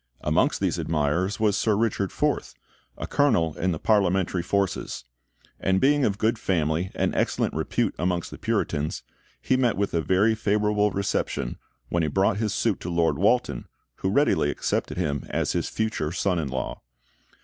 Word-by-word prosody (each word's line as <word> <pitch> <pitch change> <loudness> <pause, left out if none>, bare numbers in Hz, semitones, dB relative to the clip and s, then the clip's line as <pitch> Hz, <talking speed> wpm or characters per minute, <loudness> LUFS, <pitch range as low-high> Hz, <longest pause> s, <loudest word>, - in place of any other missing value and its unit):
Amongst - - +2
these - - 0
admirers 85 +7 0
was 105 -2 +2
Sir 105 +1 +2
Richard 105 -3 0
Forth, - - -1 0.4
a - - -4
colonel 85 - +2
in 95 +1 0
the 80 - -2
Parliamentary 95 -2 +2
forces; 100 -5 -1 0.6
and 95 0 +2
being 145 +2 +3
of 100 -1 0
good 110 +2 +1
family 85 -1 0
and - - 0
excellent - - 0
repute - - -1
amongst 90 -1 -1
the - - -9
Puritans, 75 +1 -1 0.4
he 130 - +1
met 125 -5 +1
with 100 0 -1
a 85 - +2
very 95 +7 +3
favourable 105 -1 +1
reception 95 -10 -2 0.3
when 85 - +1
he 80 - 0
brought 95 +5 +2
his 110 -1 -1
suit 105 0 0
to 90 - -5
Lord 85 -1 +1
Walton, 100 - +1 0.3
who 95 - -1
readily 125 - +2
accepted 75 - -2
him 75 -6 -2
as - - 0
his - - -1
future 110 -9 -2
son 90 0 0
in 75 - -2
law. 65 0 -4
95 Hz, 170 wpm, -25 LUFS, 85-105 Hz, 0.6 s, being